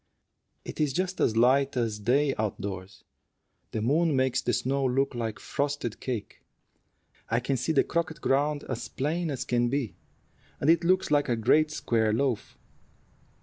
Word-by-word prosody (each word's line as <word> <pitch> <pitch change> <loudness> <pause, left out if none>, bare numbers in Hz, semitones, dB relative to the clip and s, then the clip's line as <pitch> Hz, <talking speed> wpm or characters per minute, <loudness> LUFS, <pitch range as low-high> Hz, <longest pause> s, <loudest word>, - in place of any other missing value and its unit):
It's 150 -3 -1
just 185 +4 -2
as 110 - +2
light 135 +3 +3
as 115 -3 -1
day 135 +6 +2
out 105 -2 -1
doors. 95 0 -7 0.7
The 110 - -3
moon 155 +5 +2
makes 130 -1 +1
the 120 - 0
snow 135 +4 0
look 135 +2 +1
like 115 -3 -3
frosted 140 -5 -3
cake. 120 -6 -5 0.9
I 115 - +2
can 135 +3 -1
see 130 +6 -1
the 150 - +4
croquet 170 -1 -1
ground 145 +1 +1
as 120 - -4
plain 160 +5 -2
as 135 -4 -3
can 120 0 +1
be, 130 -8 -1 0.7
and 150 - +4
it 170 - +3
looks 185 -1 +2
like 145 -2 +3
a 120 - +2
great 150 +8 +3
square 115 -7 0
loaf. 130 -2 -1
130 Hz, 160 wpm, -28 LUFS, 115-145 Hz, 0.9 s, the